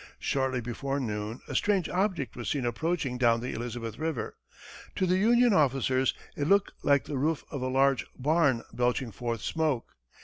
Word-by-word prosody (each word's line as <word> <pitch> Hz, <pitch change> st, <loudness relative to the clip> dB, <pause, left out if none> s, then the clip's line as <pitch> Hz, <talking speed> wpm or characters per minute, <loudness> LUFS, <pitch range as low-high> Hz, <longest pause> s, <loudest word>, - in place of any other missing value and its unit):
Shortly 130 Hz, -2 st, 0 dB
before 135 Hz, +4 st, -3 dB
noon, 105 Hz, -2 st, -4 dB
a -, -, -6 dB
strange 200 Hz, -4 st, +2 dB
object 180 Hz, -, -1 dB
was 120 Hz, -, -4 dB
seen 140 Hz, -5 st, -1 dB
approaching 130 Hz, +1 st, -1 dB
down 115 Hz, -2 st, +4 dB
the 125 Hz, +2 st, -4 dB
Elizabeth 115 Hz, 0 st, -5 dB
river. 160 Hz, -5 st, -3 dB, 0.6 s
To 185 Hz, -, +1 dB
the 185 Hz, +1 st, +2 dB
Union 240 Hz, +2 st, +5 dB
officers, 135 Hz, -4 st, +2 dB, 0.2 s
it 145 Hz, -, -1 dB
looked 200 Hz, +2 st, +3 dB
like 140 Hz, -1 st, +3 dB
the 140 Hz, -3 st, -3 dB
roof 155 Hz, +2 st, 0 dB
of 140 Hz, -, -4 dB
a 130 Hz, -, -1 dB
large 135 Hz, 0 st, +2 dB
barn 140 Hz, -4 st, +2 dB
belching 125 Hz, 0 st, 0 dB
forth 115 Hz, +2 st, -3 dB
smoke. 155 Hz, -7 st, -1 dB
135 Hz, 170 wpm, -29 LUFS, 120-160 Hz, 0.6 s, Union